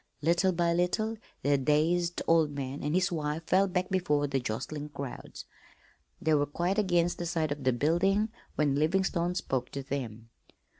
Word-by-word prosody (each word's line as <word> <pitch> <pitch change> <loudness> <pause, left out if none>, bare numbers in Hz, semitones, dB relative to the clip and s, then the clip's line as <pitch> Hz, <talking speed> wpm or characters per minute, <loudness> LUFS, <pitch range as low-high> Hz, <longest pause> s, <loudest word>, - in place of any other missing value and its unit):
Little 175 +4 +3
by 170 -1 +1
little 200 +6 0 0.3
the 140 +1 +3
dazed 165 +5 +1
old 165 -2 +4
man 140 -1 -5
and 150 +3 -1
his 185 +1 +2
wife 155 -1 -2
fell 195 +2 +3
back 180 0 -1
before 150 -6 +1
the 135 -1 0
jostling 145 +6 -4
crowds. 140 -3 -7 0.7
They 160 - +1
were 145 -1 +3
quite 175 +7 0
against 175 -3 +1
the 175 - -2
side 160 -3 -1
of 145 -1 -4
the 130 - +4
building 175 - +2 0.3
when 145 -2 +2
Livingstone 175 +3 +1
spoke 130 -7 -2
to 140 - -4
them. 115 -5 -5
160 Hz, 165 wpm, -29 LUFS, 145-175 Hz, 0.7 s, old